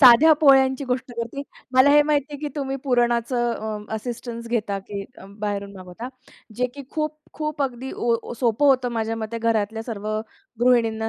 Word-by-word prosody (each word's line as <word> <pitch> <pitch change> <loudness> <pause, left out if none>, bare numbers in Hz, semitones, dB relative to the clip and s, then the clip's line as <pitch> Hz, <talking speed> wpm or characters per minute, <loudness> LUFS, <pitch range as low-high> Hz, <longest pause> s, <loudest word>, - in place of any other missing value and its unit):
साध्या 265 +4 +9
पोळ्यांची 270 -1 +5
गोष्ट 255 0 -2
करते. 235 +4 -4 0.3
मला 260 +2 +7
हे 295 0 +7
माहिती 290 -2 +1
आहे 290 - -5
की 300 - -2
तुम्ही 270 -1 -2
पुरणाचं 240 -1 +2 0.3
अ, 220 - -4
असिस्टन्स 235 +1 -5
घेता 210 -4 -1
की 200 0 -6 0.4
बाहेरून 200 -1 -3
मागवता? 185 +6 -8 0.5
जे 250 - +2
की 285 - -7
खूप-खूप 305 -1 -3
अगदी 260 0 -3
ओ 235 0 0
सोपं 240 +4 +3
होतं 260 -2 +4
माझ्या 225 0 -1
मते 225 +1 -4
घरातल्या 225 -1 0
सर्व 215 -3 -5 0.5
गृहिणींना 230 -3 +3
240 Hz, 155 wpm, -23 LUFS, 225-270 Hz, 0.5 s, साध्या